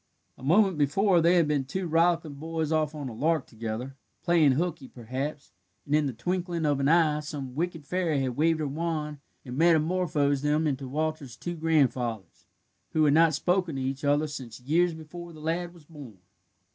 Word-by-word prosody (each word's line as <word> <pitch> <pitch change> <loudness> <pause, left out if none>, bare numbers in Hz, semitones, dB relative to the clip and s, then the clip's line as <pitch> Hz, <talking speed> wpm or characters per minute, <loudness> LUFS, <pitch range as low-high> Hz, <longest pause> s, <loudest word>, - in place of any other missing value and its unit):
A - - -18
moment 180 +4 +3
before 175 +5 +3
they 170 +2 +4
had 170 -3 +4
been 150 -2 +1
two 180 +8 -4
rollicking 165 -1 +2
boys 160 0 -3
off 155 -1 0
on 145 -3 -5
a 120 - -6
lark 155 +5 0
together 115 +3 -6 0.3
playing 165 -5 +4
hooky, 155 -2 -2
perhaps 130 +5 -6 0.3
and 140 - -3
in 150 -1 +3
the - - -2
twinkling 175 - -2
of 145 -2 +1
an 140 - +1
eye 155 -2 +4
some 145 -4 -6
wicked 165 0 -3
fairy 170 -5 0
had 130 -2 -2
waved 160 +2 +2
her 150 - -1
wand 150 0 -3 0.3
and 125 -1 -6
metamorphosed 160 -3 +2
them 150 +2 +1
into 135 -2 -2
Walter's 150 -3 -3
two 175 - -4
grandfathers, 130 - 0 0.5
who 155 -1 +3
had 145 - +4
not 160 -1 +5
spoken 180 0 0
to 135 - -3
each 135 +2 -3
other 145 +2 +2
since 130 -7 -8
years 165 +6 +2
before 170 +2 -9
the 155 - -12
lad 170 +3 -2
was 170 -3 -18
born. 145 - -12
155 Hz, 185 wpm, -27 LUFS, 140-165 Hz, 0.5 s, not